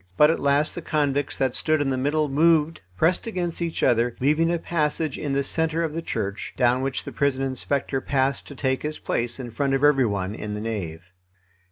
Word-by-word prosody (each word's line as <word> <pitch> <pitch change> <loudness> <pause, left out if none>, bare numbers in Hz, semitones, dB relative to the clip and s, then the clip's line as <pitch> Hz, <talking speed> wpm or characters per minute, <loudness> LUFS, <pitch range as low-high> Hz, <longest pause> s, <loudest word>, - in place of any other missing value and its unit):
But 150 +1 +6
at - - -1
last 140 +2 +2
the - - -5
convicts 145 -2 0
that 130 -2 +1
stood 155 -1 +1
in 140 -2 0
the - - +1
middle 150 +4 +1
moved, 160 +2 +2 0.2
pressed 175 - +2
against 175 -6 -3
each 170 -1 -2
other, 120 0 +2
leaving 155 +5 +2
a 175 - +1
passage 155 -2 -1
in 145 -2 -3
the 140 0 +1
centre 160 +3 +1
of 160 -2 -2
the 165 - -3
church, 100 -10 -4
down 125 0 +3
which 135 0 -2
the - - -7
prison 140 -1 0
inspector 135 0 -2
passed 135 0 0
to 140 - -10
take 130 0 -1
his 155 0 -4
place 120 +2 -2
in 120 -2 -6
front 135 +4 0
of 135 - -1
every 135 -4 +5
one 100 -1 -2
in 105 -1 -5
the 105 - -5
nave. 90 -8 -4
140 Hz, 215 wpm, -24 LUFS, 130-155 Hz, 0.2 s, But